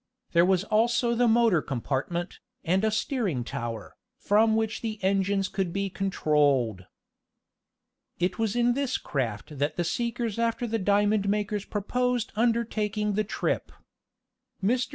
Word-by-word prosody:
There 170 +1 +4
was 190 -1 +3
also 235 +3 +2
the 240 +1 +3
motor 225 -7 +4
compartment, 140 +7 -3 0.3
and 185 +4 +2
a 220 - +3
steering 215 - -1
tower, 115 -1 -5 0.2
from 220 +2 +3
which 220 -1 -1
the 220 -2 -3
engines 195 0 +1
could 190 -3 -2
be 195 +1 -2
controlled. 145 - +1 1.3
It 180 +3 -1
was 225 -1 0
in 240 0 +3
this 275 0 -1
craft 130 +1 -4
that 145 +2 0
the 175 - 0
seekers 235 +3 -2
after 230 +1 0
the 225 -1 -1
diamond 205 +1 +2
makers 210 0 -1
proposed 245 +3 -1
undertaking 215 -2 0
the 215 +2 +1
trip. 210 - -2 0.9
Mr. 245 +5 +1
205 Hz, 135 wpm, -27 LUFS, 175-230 Hz, 1.3 s, There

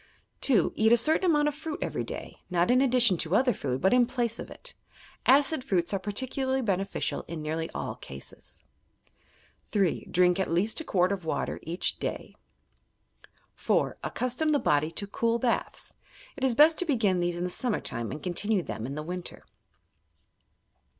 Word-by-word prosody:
2. 230 - +3
Eat 220 +1 +3
a 235 - +7
certain 315 +9 +3
amount 295 -2 +3
of 295 - 0
fruit 310 +1 -5
every - - -2
day, - - -8
not 175 +3 +2
in 255 +1 +5
addition 245 -7 +4
to 165 +3 0
other 250 +2 +4
food, 130 -2 -3
but 190 - +4
in 250 -1 +5
place 235 -2 -1
of - - -7
it. - - -10 0.5
Aeid 280 +1 +4
fruits 185 -7 0
are 195 - +1
partieuiarly 260 +5 -2
beneficial 195 -1 -1
in 165 -1 -5
nearly 160 +1 -2
all - - -3
cases. 70 0 -10 1.1
3. 195 -5 0
Drink 180 +1 +3
at 190 - 0
least 185 - +1
a - - -4
quart 185 - +2
of 195 -3 -3
water 160 - -2
each 170 +3 -2
day. - - -4 1.2
4. - - 0
Accustom 255 +5 -1
the 300 - +4
body 150 - +2
to 200 +5 -3
cool 230 +3 0
baths. 235 0 -2 0.4
It 280 - -7
is 260 -3 +2
best 310 +4 +6
to 360 - -1
begin 220 - +2
these 175 0 -1
in 175 - -2
the 180 - -2
summer 240 +2 0
time 120 -2 -4
and 150 - -7
continue 190 +2 0
them 115 -5 -5
in 140 - -5
the 150 - -4
winter. 180 +2 -6
205 Hz, 175 wpm, -28 LUFS, 175-260 Hz, 1.2 s, a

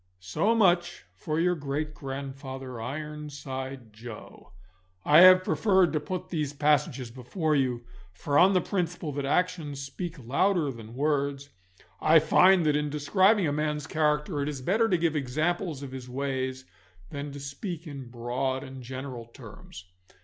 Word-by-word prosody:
So 95 - 0
much 175 -5 +2
for 155 -2 -3
your 180 +1 +3
great 150 -1 -3
grandfather, 135 -3 -7
Ironside 135 -3 -6
Joe. 105 -3 -11 0.5
I 150 +2 +7
have 185 +1 +9
preferred 190 -4 +3
to 155 - +1
put 180 +5 -5
these 150 -4 -2
passages 145 -4 +1
before 150 - -1
you, 125 -4 0 0.3
for 140 +10 -4
on 190 +2 +6
the 185 - +3
principle 175 -5 -2
that 140 0 -3
actions 160 -2 0
speak 165 +5 -6
louder 145 - +1
than 115 -1 -11
words, 140 0 -1 0.5
I 160 +1 +6
find 180 +3 +5
that 150 -1 +3
in 150 0 0
describing 185 +7 +3
a 145 - 0
man's 150 -1 -1
character 150 0 0
it 140 - -1
is 135 -3 -6
better 220 - +2
to 180 - +3
give 165 -1 0
examples 155 +3 -1
of 135 - -7
his 130 -1 -8
ways 130 0 -3 0.5
than 145 0 -5
to 140 - -7
speak 155 +5 -6
in 140 -5 -8
broad 125 +2 -2
and 130 -1 -9
general 130 -1 -7
terms. 105 -5 -12
145 Hz, 155 wpm, -28 LUFS, 130-165 Hz, 0.5 s, have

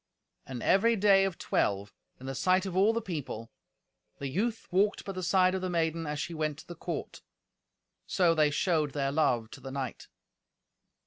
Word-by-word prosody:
And 125 -2 -6
every 230 +4 +4
day 195 -2 +5
of 190 -3 -3
twelve, 100 +1 -1 0.3
in 130 - -10
the 135 - -3
sight 185 +7 +2
of 190 -2 -4
all 200 +4 +5
the 230 0 -2
people, 145 - -5 0.7
the 140 - -4
youth 220 - -2
walked 200 +3 +2
by 195 - -3
the 185 -1 -5
side 185 +1 +3
of 190 - -2
the 185 - -2
maiden 165 -1 0
as 150 0 -3
she 175 +2 -3
went 155 -2 -2
to 160 - -13
the 175 - -7
court. 165 - -6 0.9
So 175 -3 +3
they 155 -2 +3
showed 155 -1 +1
their 140 -1 0
love 120 -7 +1
to - - -10
the 135 - -7
knight. 135 -2 -5
165 Hz, 190 wpm, -30 LUFS, 140-190 Hz, 0.9 s, day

